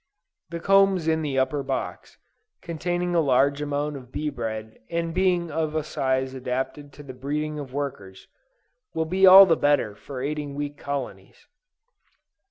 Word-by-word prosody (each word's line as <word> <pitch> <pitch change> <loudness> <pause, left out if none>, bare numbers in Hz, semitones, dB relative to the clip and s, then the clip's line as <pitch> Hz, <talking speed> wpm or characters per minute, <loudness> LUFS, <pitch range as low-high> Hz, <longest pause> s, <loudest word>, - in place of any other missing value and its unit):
The 170 0 -5
combs 195 -2 +3
in 160 0 +2
the 145 -3 -2
upper 135 +2 +1
box, 135 - -5 0.5
containing 175 +2 -2
a 170 - +3
large 140 0 +2
amount 145 0 -2
of 125 -2 -13
bee 150 +2 -3
bread 110 -3 -6
and 165 -1 -2
being 180 -2 +1
of 155 0 -2
a 155 - 0
size 130 -1 -1
adapted 130 +3 -4
to 145 - -12
the 135 -2 -9
breeding 150 +4 -3
of 140 -3 -7
workers, 135 -9 -6 0.7
will 160 - 0
be 190 +4 +4
all 190 +1 +11
the 170 -3 +3
better 145 -9 +1
for 130 +5 -9
aiding 145 -1 -4
weak 145 0 -4
colonies. 130 - -6
145 Hz, 160 wpm, -25 LUFS, 130-165 Hz, 0.7 s, all